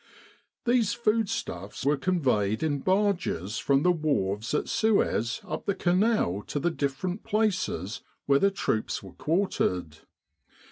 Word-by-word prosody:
These 235 Hz, -4 st, +3 dB
foodstuffs 215 Hz, -, -2 dB
were 145 Hz, +1 st, +4 dB
conveyed 130 Hz, -, +1 dB
in 145 Hz, -3 st, 0 dB
barges 185 Hz, -, 0 dB
from 140 Hz, 0 st, +2 dB
the 180 Hz, -, +5 dB
wharves 115 Hz, -, -1 dB
at -, -, 0 dB
Suez 200 Hz, -, +1 dB
up -, -, -6 dB
the 200 Hz, -, +1 dB
Canal 180 Hz, -, +2 dB
to 145 Hz, -, -2 dB
the 175 Hz, +4 st, +1 dB
different 165 Hz, +7 st, -3 dB
places 185 Hz, -, -1 dB, 0.2 s
where 140 Hz, 0 st, +4 dB
the 200 Hz, -, +4 dB
troops 110 Hz, -, -2 dB
were 95 Hz, -, -11 dB
quartered. 90 Hz, -, -1 dB
155 Hz, 130 wpm, -27 LUFS, -, 0.2 s, the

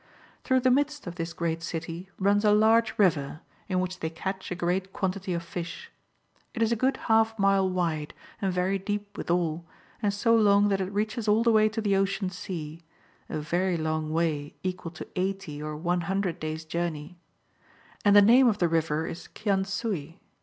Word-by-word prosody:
Through 260 Hz, 0 st, +2 dB
the 255 Hz, 0 st, +4 dB
midst 290 Hz, +2 st, +1 dB
of 175 Hz, -, -5 dB
this 165 Hz, -1 st, -4 dB
great 165 Hz, -1 st, -2 dB
city 165 Hz, +2 st, -5 dB
runs 200 Hz, +2 st, +2 dB
a 210 Hz, -, +5 dB
large 220 Hz, +2 st, +4 dB
river, 155 Hz, -6 st, +1 dB, 0.3 s
in 185 Hz, -1 st, +1 dB
which 185 Hz, 0 st, -3 dB
they 160 Hz, -, -2 dB
catch 190 Hz, +4 st, -5 dB
a 180 Hz, -, -3 dB
great 185 Hz, +2 st, -1 dB
quantity 190 Hz, 0 st, -2 dB
of 170 Hz, -1 st, -2 dB
fish. 175 Hz, -, -7 dB, 0.6 s
It 230 Hz, -, +1 dB
is 225 Hz, -, +1 dB
a -, -, +3 dB
good 260 Hz, +4 st, +1 dB
half 225 Hz, 0 st, +3 dB
mile 195 Hz, -1 st, +3 dB
wide, 165 Hz, -5 st, -2 dB, 0.3 s
and 195 Hz, -2 st, +1 dB
very 185 Hz, +2 st, 0 dB
deep 205 Hz, +1 st, -4 dB
withal, 170 Hz, -1 st, -1 dB, 0.4 s
and 205 Hz, -2 st, +2 dB
so 230 Hz, +3 st, +2 dB
long 205 Hz, -2 st, +5 dB
that 195 Hz, -1 st, +1 dB
it 190 Hz, +1 st, -3 dB
reaches 215 Hz, +2 st, -2 dB
all 215 Hz, +2 st, +4 dB
the 235 Hz, -, +4 dB
way 215 Hz, -1 st, +5 dB
to 220 Hz, +1 st, -3 dB
the 200 Hz, -2 st, +2 dB
Ocean 195 Hz, -1 st, 0 dB
Sea, 165 Hz, -3 st, -6 dB, 0.2 s
— -, -, -34 dB
a -, -, -3 dB
very 175 Hz, +4 st, 0 dB
long 155 Hz, -1 st, -2 dB
way, 155 Hz, -3 st, -1 dB
equal 185 Hz, -2 st, -3 dB
to 175 Hz, -, -9 dB
80 185 Hz, -5 st, -3 dB
or 150 Hz, 0 st, -4 dB
100 175 Hz, +2 st, -1 dB
days' 155 Hz, 0 st, -4 dB
journey. 170 Hz, 0 st, -4 dB, 0.8 s
And 205 Hz, -1 st, +5 dB
the 205 Hz, -, +9 dB
name 245 Hz, +5 st, +7 dB
of 215 Hz, -3 st, +2 dB
the 175 Hz, -, +2 dB
River 160 Hz, -1 st, 0 dB
is 165 Hz, -, -7 dB
Kian 195 Hz, -3 st, 0 dB
suy. 195 Hz, -, -3 dB
185 Hz, 190 wpm, -27 LUFS, 165-205 Hz, 0.8 s, the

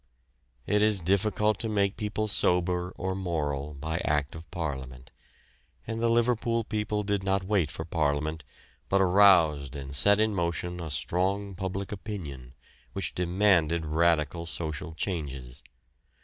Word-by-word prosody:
It 105 Hz, 0 st, +2 dB
is 105 Hz, -2 st, +6 dB
difficult 100 Hz, +3 st, +1 dB
to 115 Hz, -, 0 dB
make 100 Hz, -2 st, +1 dB
people 110 Hz, 0 st, -2 dB
sober 90 Hz, -2 st, +1 dB
or 95 Hz, +1 st, -2 dB
moral 75 Hz, -6 st, -3 dB
by 80 Hz, +4 st, -3 dB
act 75 Hz, -2 st, 0 dB
of 80 Hz, 0 st, -11 dB
parliament, 65 Hz, -6 st, -6 dB, 0.7 s
and 115 Hz, 0 st, -4 dB
the 115 Hz, -, +2 dB
Liverpool 115 Hz, 0 st, +1 dB
people 105 Hz, -1 st, -2 dB
did 100 Hz, -1 st, 0 dB
not 95 Hz, 0 st, 0 dB
wait 95 Hz, -5 st, +1 dB
for 80 Hz, +2 st, -6 dB
Parliament, 75 Hz, -1 st, -1 dB, 0.5 s
but 100 Hz, -, +3 dB
aroused 90 Hz, -8 st, +4 dB
and 70 Hz, 0 st, -6 dB
set 100 Hz, +8 st, +5 dB
in 110 Hz, 0 st, +2 dB
motion 90 Hz, -1 st, -2 dB
a 85 Hz, -2 st, -5 dB
strong 95 Hz, +8 st, -1 dB
public 95 Hz, +1 st, -4 dB
opinion, 75 Hz, -, -7 dB, 0.4 s
which -, -, -3 dB
demanded 90 Hz, -3 st, +2 dB
radical 85 Hz, +1 st, +1 dB
social 80 Hz, 0 st, -5 dB
changes. 70 Hz, -8 st, -5 dB
90 Hz, 135 wpm, -28 LUFS, 75-100 Hz, 0.7 s, is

